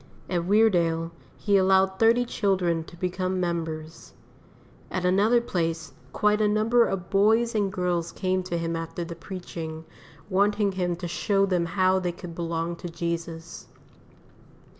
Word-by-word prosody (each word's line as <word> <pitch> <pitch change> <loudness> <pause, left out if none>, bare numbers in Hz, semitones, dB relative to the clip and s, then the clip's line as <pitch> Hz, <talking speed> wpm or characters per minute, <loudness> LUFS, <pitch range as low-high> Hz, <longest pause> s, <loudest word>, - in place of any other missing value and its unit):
At 175 -2 0
Weardale 175 -5 +2 0.3
he 200 -2 +2
allowed 190 0 +3
thirty 230 +2 +4
children 185 -7 0
to 170 - -13
become 185 +1 -2
members. 165 -2 -4 0.8
At 180 -1 -2
another 205 +6 +4
place 165 -7 -2 0.2
quite 210 0 +2
a 210 - +4
number 220 +3 +3
of 180 -3 -4
boys 220 +4 +3
and 205 -3 0
girls 175 -2 -1
came 185 -1 -1
to 175 -2 -2
him 165 0 -2
after 165 +1 -4
the 170 0 -7
preaching, 165 -3 -7 0.4
wanting 205 +1 +2
him 180 -2 -1
to 175 +1 -6
show 195 +3 +1
them 180 -3 0
how 185 0 +4
they 180 -2 -2
could 175 -1 -9
belong 170 0 -3
to 175 - -7
Jesus. 170 0 -5
180 Hz, 145 wpm, -26 LUFS, 170-200 Hz, 0.8 s, thirty